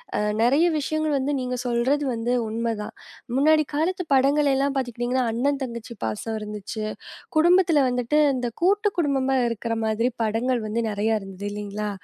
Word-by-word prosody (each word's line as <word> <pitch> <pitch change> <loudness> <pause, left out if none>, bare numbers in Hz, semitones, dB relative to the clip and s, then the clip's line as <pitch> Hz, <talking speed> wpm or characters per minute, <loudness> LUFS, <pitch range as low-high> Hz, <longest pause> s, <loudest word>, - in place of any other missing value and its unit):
அ, - - +1 0.2
நெறைய 280 +8 +4
விஷயங்கள் 310 0 -1
வந்து 270 +2 -1
நீங்க 250 0 -2
சொல்றது 250 +5 +1
வந்து 230 +2 -1 0.2
உண்மதான். 225 -1 -3 0.4
முன்னாடி 310 +2 +4
காலத்து 360 +5 0
படங்கள் 280 +2 +4
எல்லாம் 275 +1 +1
பாத்துக்கிட்டீங்கன்னா, 250 0 -1
அண்ணன், 275 +5 0
தங்கச்சி 235 -1 -6
பாசம் 110 - -3
இருந்துச்சு. 210 +1 -6 0.5
குடும்பத்துல 340 -3 +5
வந்துட்டு, 250 +3 0 0.2
இந்த 245 -1 -2 0.2
கூட்டுக் 410 +2 +2
குடும்பமா 270 -3 +1
இருக்கிற 230 0 -3
மாதிரி 225 +3 +1
படங்கள் 230 +3 0
வந்து 225 +2 -2
நெறையா 215 +2 0
இருந்து 195 +1 -8
இல்லைங்களா? 210 0 -4
250 Hz, 145 wpm, -24 LUFS, 225-285 Hz, 0.5 s, குடும்பத்துல